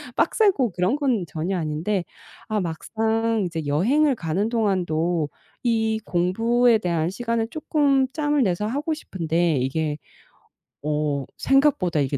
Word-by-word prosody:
빡세고 375 - +2
그런 180 +8 +1
건 255 - 0
전혀 165 +5 -2
아닌데 170 +5 -1 0.4
아 215 -2 0
막상 220 +5 -1
이제 165 -3 -5
여행을 250 - +3
가는 190 0 -1
동안도 175 -8 0 0.3
이 220 -2 +1
공부에 225 +7 +2
대한 170 -5 -1
시간을 230 +2 -2
쪼끔 285 -2 +2
짬을 295 -2 +1
내서 195 0 0
하고 290 +7 -1
싶은데 170 - -1
이게 150 +4 -1 0.9
어 150 -2 -1
생각보다 270 - +2
이게 140 0 -1
200 Hz, 260 characters per minute, -23 LUFS, 165-240 Hz, 0.9 s, 여행을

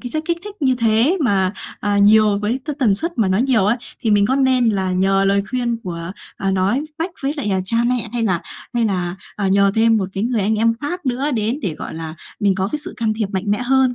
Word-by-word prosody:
cái 245 - -5
chất 310 +3 0
kích 340 0 -1
thích 415 -1 -8
như 260 -3 +3
thế 230 - +2
mà, 190 -4 +2 0.3
à, 205 0 +1
nhiều 210 0 +5
với 215 +6 -1
t 305 - -3
tần 230 -8 +3
suất 335 - 0
mà 210 - +3
nó 185 +1 +2
nhiều 245 -4 +2
ấy 210 +4 +2 0.2
thì 230 - 0
mình 205 -1 +4
có 265 +5 +1
nên 260 -3 +3
là 190 -3 0
nhờ 195 +1 +2
lời 200 0 +2
khuyên 240 -2 -1
của, 170 -1 -5 0.3
à, 195 - -1
nói 195 +8 +1 0.2
mách 330 +4 -2
với 275 +1 0
lại, 235 -8 -2
à, 190 - +1
cha 210 +5 +1
mẹ 245 -2 -1
hay 240 - -1
là 185 -6 +1 0.3
hay 235 - +2
là, 180 -4 -1 0.2
à, 200 -2 0
nhờ 200 +1 +4
thêm 225 0 +4
một 195 -3 -1
cái 195 +3 -2
người 235 -2 0
anh 215 +3 +1
em 230 +1 +3
khác 325 +1 -4
nữa 260 +4 0
đến 225 +4 0
để, 165 -5 -2
gọi - - -6
là, 160 -1 -5 0.3
mình 200 -2 +3
có 190 +1 -1
cái 300 - 0
sự 360 +5 -7
can 225 -2 0
thiệp 215 -1 -1
mạnh 190 -1 -2
mẽ 205 - +2
hơn 260 0 +2
220 Hz, 265 wpm, -19 LUFS, 195-255 Hz, 0.3 s, nhiều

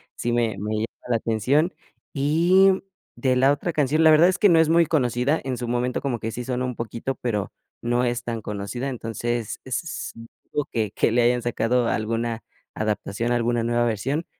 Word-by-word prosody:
sí 120 - -2
me 115 -3 0
me 105 +3 -3
llama 110 +2 -1 0.2
la 120 - +3
atención.Y 155 - +1 0.3
de 130 -2 +1
la 130 +2 +4
otra 165 +4 -2
canción, 150 +2 +2
la 160 - +7
verdad 155 +2 +7
es 185 +1 0
que 205 - +5
no 165 - +5
es 160 -1 +4
muy 165 -1 +4
conocida. 130 0 +1
En 130 -2 -3
su 120 - -4
momento 125 +1 -1
como 135 -4 -1
que 110 +1 -4
sí 125 - -5
sonó 125 0 -1
un 125 -1 -4
poquito, 115 +3 -4
pero 105 -5 -2 0.3
no 120 +1 +1
es 120 0 -1
tan 115 -2 -4
conocida, 105 +6 -4
entonces, 120 -2 -3
es 130 +6 -2
s 165 - -5 0.4
dudo 145 -1 -1
que 110 -2 -1
que 110 - +1
le 120 - +3
hayan 120 0 +2
sacado 120 0 +1
alguna 115 +1 -2 0.3
adaptación, 110 +2 -2
alguna 120 0 +1
nueva 120 +1 +1
versión. 130 +9 -1
120 Hz, 190 wpm, -24 LUFS, 115-140 Hz, 0.4 s, la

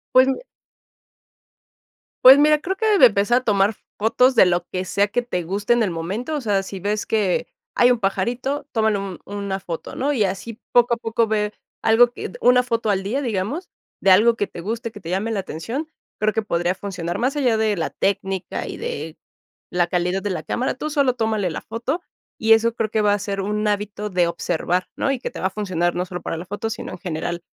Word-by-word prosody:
Pues 260 +1 +7
mi 265 - -1 1.8
Pues 265 +2 +10
mira, 300 +1 +5
creo 375 +5 -3
que 430 0 +2
de 300 - +9
empezar 220 +2 +3
a - - -24
tomar 205 -2 +2 0.2
fotos 250 +5 +3
de 230 - +7
lo 175 0 +1
que 185 0 -2
sea 200 +2 +1
que 245 +4 0
te 210 -8 -3
guste 200 +7 0
en 240 -1 +2
el 200 - 0
momento, 195 - -3
o 295 - -2
sea, 205 -5 +1
si 195 0 -7
ves 205 +3 -1
que 205 -5 0 0.3
hay 245 +1 +5
un 245 - +1
pajarito, 245 +8 -1
tómale 220 -2 +2
un 195 -3 -6
una 200 -1 -4
foto, 170 -4 -6
¿no? 275 +3 0
Y 230 -6 +2
así 200 +4 -4
poco 240 0 +4
a - - -13
poco 225 0 0
ve 210 -1 0 0.3
algo 235 +2 +5
que - - -6
d - - -11
una 250 0 +5
foto 230 -3 -1
al 195 -2 +1
día, 235 +9 -1
digamos, 235 - -3 0.3
de 195 - +3
algo 225 +5 +6
que 205 -3 -1
te 170 - -9
guste, 230 +5 -4
que 210 - -11
te 170 - -8
llame 200 +5 -1
la 205 -3 -1
atención, 225 - -5 0.3
creo 215 0 +1
que 225 - 0
podría 175 -4 0
funcionar 180 -3 -5
más 260 +4 0
allá 250 -6 +2
de 220 -1 +1
la 165 - -1
técnica 195 -1 -2
y - - -6
de 155 +2 -5 0.5
la 175 -1 +2
calidad 180 +2 -1
de 205 - -2
la 185 - -3
cámara, 255 - -1
tú 305 +4 -4
solo 280 -4 +2
tómale 220 -5 0
la 160 - -4
foto, 245 +10 -3 0.4
y 225 0 +4
eso 225 +1 +4
creo 220 -2 -2
que 220 - +1
va 205 -1 +3
a - - 0
ser 200 0 -3
un 210 +2 -1
hábito 210 0 -2
de 180 -2 +2
observar, 175 +1 -1
¿no? 275 - 0
Y 275 - 0
que - - -4
te - - -8
va - - 0
a - - 0
funcionar 185 -4 -1
no 180 - -1
solo 180 -1 -6
para - - -3
la 165 - -6
foto, 205 +5 -4
sino 225 - -6
en - - -8
general 175 -1 -4
210 Hz, 230 wpm, -22 LUFS, 190-240 Hz, 1.8 s, Pues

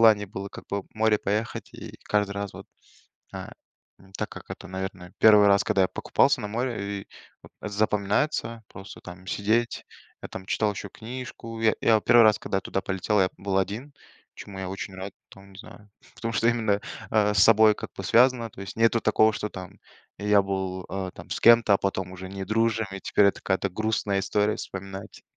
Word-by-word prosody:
желание 110 -2 +5
было 100 0 -6
как - - -11
бы 100 0 -1
в - - -28
море 110 -1 +3
поехать, 105 +3 -3
и - - -10
каждый 105 -1 0
раз 100 -1 -4
вот, - - -10 0.7
э, - - -6 0.7
так - - -2
как - - -10
это, - - -8
наверное, 95 -1 -6
1 105 -2 +7
раз, 100 0 +4
когда 95 - +2
я 95 - +2
покупался - - +2
на 105 - -4
море, 120 0 -2 0.2
и - - -18 0.4
вот - - -15 0.2
запоминается, 110 +3 0
просто 95 +2 -11
там 90 +1 -11
сидеть, 110 +5 0 0.4
я - - -6
там 95 - -8
читал 105 +1 +1
еще 100 0 -7
книжку. 115 0 -8
Я 115 -1 +3
я 110 -1 +4
1 120 +2 +6
раз, 110 -1 +5
когда 95 - -3
я - - -4
туда 95 - -2
полетел, 95 +2 0
я 95 - +3
был 95 -1 0
один, 105 +10 -3 0.4
чему 100 -2 -10
я 95 -1 -4
очень 95 0 -6
рад 95 +1 -7 0.2
там, 95 0 -15
не 95 - -14
знаю. 105 0 -13 0.3
Потому 115 0 -3
что 115 +2 +2
именно, 110 -4 +1 0.3
э, 105 -1 +3
с - - +1
собой 110 +1 +6
как - - -8
бы - - -5
связано, 120 +2 +4
то 95 - -13
есть 100 - -7
нету 115 +1 +3
такого, 110 0 +4
что 105 0 -4
там 90 -2 -9 0.4
я 105 0 +4
был, 95 -1 -3
э, 95 -1 -3
там - - -12
с - - -2
кем-то, 115 -3 +6
а - - +3
потом 95 -1 -2
уже 95 0 -8
не 95 0 -6
дружим, 110 +1 +1
и 95 - -6
теперь 100 - +3
это 100 - +1
какая-то 95 0 0
грустная 105 0 -1
история 105 +2 +1
вспоминать. 95 +1 -8
105 Hz, 200 wpm, -26 LUFS, 95-110 Hz, 0.7 s, 1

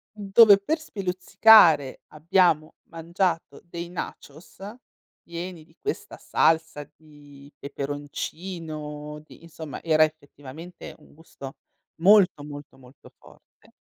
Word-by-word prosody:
dove 205 0 +6
per 305 +12 -2
speluzzicare 185 - +4
abbiamo 160 -1 +1 0.2
mangiato 165 -2 -3
dei 170 0 -8
nachos 160 -2 -9 0.6
pieni 170 0 -8
di 160 +1 -26
questa 420 - -5
salsa 160 -3 0
di 145 -2 -17
peperoncino, 150 +1 -7
di, 155 - -18
insomma, 160 -3 -9
era 155 -1 +3
effettivamente 155 +2 -8
un 150 - -21
gusto 140 -3 -12 0.5
molto, 185 -5 +5
molto, 145 -2 -11
molto 130 +1 -18
forte. - - -22
160 Hz, 100 wpm, -24 LUFS, 145-180 Hz, 0.6 s, dove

